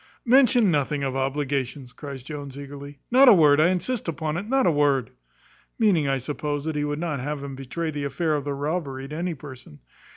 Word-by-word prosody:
"Mention 245 Hz, -4 st, +5 dB
nothing 145 Hz, -1 st, 0 dB
of 135 Hz, -1 st, -2 dB
obligations," 135 Hz, -1 st, -2 dB
cries 135 Hz, -1 st, -8 dB
Jones 140 Hz, -1 st, -7 dB
eagerly; 140 Hz, 0 st, -9 dB
"not 260 Hz, +2 st, +8 dB
a -, -, +9 dB
word, 150 Hz, -5 st, +5 dB
I 160 Hz, -, +5 dB
insist 185 Hz, +6 st, -2 dB
upon 160 Hz, -1 st, -2 dB
it, 200 Hz, +6 st, -4 dB
not 270 Hz, 0 st, +3 dB
a 175 Hz, -, +4 dB
word" 145 Hz, -4 st, +1 dB, 0.7 s
(meaning, 185 Hz, -10 st, +3 dB
I 135 Hz, 0 st, +1 dB
suppose, 145 Hz, +2 st, -4 dB
that 160 Hz, -1 st, -2 dB
he 145 Hz, -, 0 dB
would 145 Hz, 0 st, -2 dB
not 155 Hz, -4 st, -2 dB
have 145 Hz, +2 st, -4 dB
him 140 Hz, -1 st, -6 dB
betray 155 Hz, +5 st, -4 dB
the 145 Hz, -1 st, -4 dB
affair 155 Hz, +4 st, -1 dB
of 145 Hz, -2 st, -1 dB
the 145 Hz, -, -2 dB
robbery 140 Hz, -2 st, -3 dB
to 150 Hz, -, -7 dB
any 170 Hz, +1 st, -2 dB
person). 130 Hz, -, -12 dB
145 Hz, 205 wpm, -24 LUFS, 140-165 Hz, 0.7 s, a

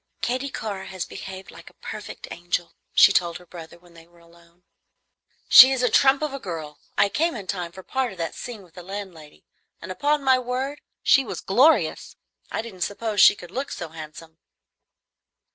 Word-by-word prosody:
"Katy 255 Hz, +3 st, -1 dB
Carr 200 Hz, -6 st, -5 dB
has 185 Hz, -2 st, -5 dB
behaved 190 Hz, 0 st, -9 dB
like -, -, -13 dB
a -, -, -26 dB
perfect -, -, -9 dB
angel," 175 Hz, 0 st, -3 dB, 0.2 s
she -, -, +8 dB
told 170 Hz, -2 st, +1 dB
her 180 Hz, -, -17 dB
brother 170 Hz, -1 st, -11 dB
when 175 Hz, 0 st, -22 dB
they 165 Hz, 0 st, -16 dB
were 175 Hz, 0 st, -25 dB
alone. 170 Hz, +1 st, -23 dB, 0.8 s
"She 260 Hz, +2 st, +10 dB
is 260 Hz, -2 st, 0 dB
a 250 Hz, -, +2 dB
trump 275 Hz, +2 st, +4 dB
of 300 Hz, -2 st, -2 dB
a 275 Hz, -, -5 dB
girl. 160 Hz, -, -7 dB, 0.2 s
I -, -, +5 dB
came 315 Hz, +10 st, -1 dB
in 205 Hz, -4 st, -7 dB
time 180 Hz, -3 st, -4 dB
for 190 Hz, +2 st, -12 dB
part 265 Hz, +1 st, -2 dB
of 190 Hz, -, -12 dB
that 165 Hz, -1 st, -3 dB
scene 230 Hz, -5 st, -8 dB
with 175 Hz, -3 st, -21 dB
the 180 Hz, -, -10 dB
landlady, 180 Hz, -5 st, -9 dB, 0.3 s
and 185 Hz, -, -8 dB
upon 290 Hz, +8 st, 0 dB
my 260 Hz, -1 st, +4 dB
word 255 Hz, +3 st, -4 dB, 0.2 s
she 275 Hz, -, +5 dB
was 240 Hz, -, -6 dB
glorious! 260 Hz, +11 st, +2 dB, 0.4 s
I -, -, -2 dB
didn't 200 Hz, -6 st, -11 dB
suppose 205 Hz, +2 st, -1 dB
she -, -, +8 dB
could 175 Hz, -3 st, -12 dB
look 265 Hz, +6 st, -4 dB
so 175 Hz, -, -6 dB
handsome." 160 Hz, +1 st, -11 dB
190 Hz, 195 wpm, -24 LUFS, 170-250 Hz, 0.8 s, She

